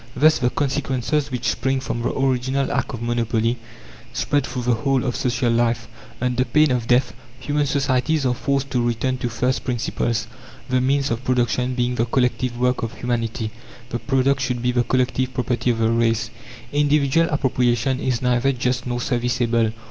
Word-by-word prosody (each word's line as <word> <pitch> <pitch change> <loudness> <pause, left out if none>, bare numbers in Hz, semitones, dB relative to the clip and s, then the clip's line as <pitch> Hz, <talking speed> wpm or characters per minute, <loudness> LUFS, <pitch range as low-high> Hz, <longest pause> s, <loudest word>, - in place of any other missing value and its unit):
Thus 155 +4 +4
the 125 - +2
consequences 140 +1 -1
which 125 -3 -3
spring 135 +3 0
from 120 -2 -3
the 120 - 0
original 135 +1 0
act - - -1
of 120 - -7
monopoly 120 0 0 0.5
spread 145 -2 0
through 125 - -4
the 125 0 +2
whole 135 +2 0
of 125 - -1
social 125 -1 0
life. 115 0 +1 0.3
Under 125 0 +1
pain 150 +2 +3
of 120 -2 -1
death, 125 +1 +3 0.3
human 145 0 0
societies 140 +1 +1
are 125 - +2
forced 140 +2 -1
to 125 - +1
return 120 +2 -1
to 120 - -2
first 125 +3 -1
principles: 120 -2 -1 0.4
the 130 0 +1
means 135 +1 +1
of 115 +2 -2
production 125 0 +1
being 125 0 0
the 115 -1 +1
collective 125 0 0
work 125 0 +1
of 115 0 -4
humanity, 115 -2 -2 0.4
the 120 - -3
product 135 +1 +1
should 125 -2 -2
be 125 - +2
the 120 0 +2
collective 130 +1 0
property 125 -1 0
of 120 - +1
the 115 0 +2
race. 115 -1 +1 0.4
Individual 145 +2 +3
appropriation 130 -3 +1
is 130 -1 -1
neither 125 +2 +2
just 125 -1 -1
nor 120 0 -1
serviceable. 120 -2 +1
125 Hz, 175 wpm, -22 LUFS, 120-135 Hz, 0.5 s, Thus